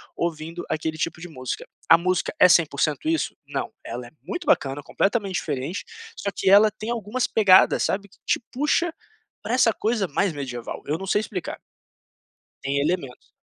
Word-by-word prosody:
ouvindo 165 0 -3
aquele 155 0 -2
tipo 160 +1 -2
de 175 - -7
música. 130 -6 -5 0.2
A 165 - +9
música 180 +1 0
é - - +9
100% 155 - +2
isso? 325 0 0
Não, - - -3
ela - - -6
é - - -16
muito 355 -1 -5
bacana, 140 - +2
completamente 195 +5 0
diferente, 145 +3 -3 0.3
só 200 - -3
que - - +1
ela 205 +2 +7
tem 215 +2 -7
algumas 235 +2 -1
pegadas, 195 -4 +5
sabe, 200 +1 -1
que - - -23
te - - +2
puxa 300 +5 +1 0.5
pra 230 - -2
essa 245 -3 +4
coisa 215 -2 0
mais 200 +2 +1
medieval, 130 -5 -5
eu 150 - 0
não 195 - -6
sei 205 - +3
explicar. - - -5 1.0
Tem 140 +1 0
elementos. 140 -5 -3
185 Hz, 170 wpm, -24 LUFS, 155-215 Hz, 1.0 s, A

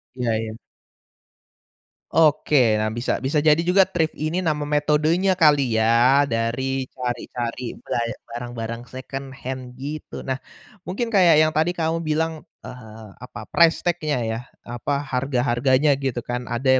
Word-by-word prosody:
Iya 125 -2 -1
iya. 110 0 -5 1.6
Oke, 145 -8 +4
nah 110 - 0
bisa 120 +3 -2
bisa 145 +3 0
jadi 155 +1 +5
juga 190 +2 +6
thrift 160 -3 -1
ini 155 +4 -2
nama 155 -4 -1
metodenya 150 +5 +2
kali 145 -8 +3
ya, 120 +5 +4
dari 130 +2 -1
cari-cari 120 -1 -4
ba - - -2 0.3
barang-barang 120 0 -6
second 135 +1 -7
hand 130 -1 -7
gitu. 145 +4 -7
Nah 130 0 -3 0.5
mungkin 230 +6 -3
kayak 180 -6 +6
yang 155 - +2
tadi 160 +3 0
kamu 165 0 -1
bilang 160 0 -2 0.2
eee, 110 -4 -10
apa 110 -3 -9
price 170 -1 +4
tag-nya 155 -7 -1
ya, 110 0 -2 0.2
apa 130 +4 -3
harga-harganya 130 +1 +1
gitu 130 -3 -2
kan, 125 0 -4
ada 130 +2 +2
135 Hz, 135 wpm, -22 LUFS, 120-155 Hz, 1.6 s, juga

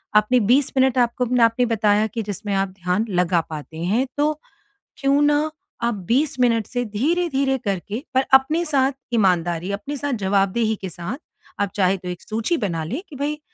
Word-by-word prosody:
अपने 215 +4 +4
20 275 +1 +3
मिनट 260 -1 +3
आपको 245 0 +2
न 250 - +3
आपने 230 +2 +4
बताया 215 -2 +2
कि 230 - -2
जिसमें 205 0 -4
आप 195 0 0
ध्यान 180 +5 +1
लगा 180 -2 +2
पाते 155 0 -8
हैं 215 +9 +1
तो 300 +1 +2 0.7
क्यों 275 +1 +3
ना 295 +1 +2 0.3
आप 235 0 +1
20 265 +2 +1
मिनट 230 -3 +3
से 245 0 -2
धीरे-धीरे 275 +4 0
करके 200 +5 -3
पर 260 +1 +3
अपने 305 +6 +5
साथ 275 -3 +2 0.2
ईमानदारी, 175 -4 +1
अपने 285 +9 -4
साथ 285 0 -2
जवाबदेही 200 +3 +1
के 190 - -4
साथ 175 - -6 0.4
आप 200 - +1
चाहें 190 -1 +2
तो 180 - -10
एक 180 -1 -6
सूची 225 +10 -1
बना 170 -8 -2
लें 240 - -4
कि 295 - -10
भई 290 +2 -2
230 Hz, 180 wpm, -22 LUFS, 195-270 Hz, 0.7 s, अपने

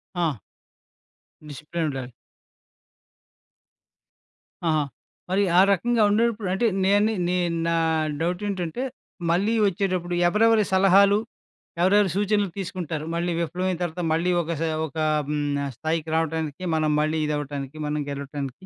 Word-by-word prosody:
ఆ! 165 -7 0 1.1
డిసిప్లెన్ 155 +3 -4
ఉండాలి. 130 -3 -5 2.6
ఆహా! 155 -2 +2 0.5
మరి 195 +2 +2 0.2
ఆ - - +9
రకంగా 235 +4 +2
ఉండేటప్పుడు, 220 -1 +1
అంటే 195 +5 0 0.2
నేను 205 +3 +3 0.2
నేను 175 -2 0
నా 170 - +1 0.5
డౌటేంటంటే, 180 +4 -2 0.5
మళ్ళీ 200 +6 +2
ఒచ్చేటప్పుడు 185 -2 -1
ఎవరెవరి 220 +3 +4
సలహాలు, 195 +2 +5 0.6
ఎవరెవరి 195 0 +4
సూచనలు 205 -1 +1
తీసుకుంటారు? 170 -5 -4
మళ్ళీ 175 +1 -1
విఫలమైన 180 +2 -2
తర్వాత 175 +1 -3
మళ్ళీ 170 +3 +1
ఒక 170 0 -4
సా 165 - 0 0.2
ఒక 145 - -12 0.3
హ్మ్ 150 -1 -1 0.2
ఆహ్, 140 - -4
స్థాయికి 160 +2 -2
రావటానికి, 160 0 -2
మనం 155 -1 +1
మళ్ళీ 155 +1 0
ఇదవ్వటానికి, 145 -1 -4
మనం 150 0 -1
గెలవటానికి, 140 +3 -6
175 Hz, 115 wpm, -24 LUFS, 155-195 Hz, 2.6 s, ఆ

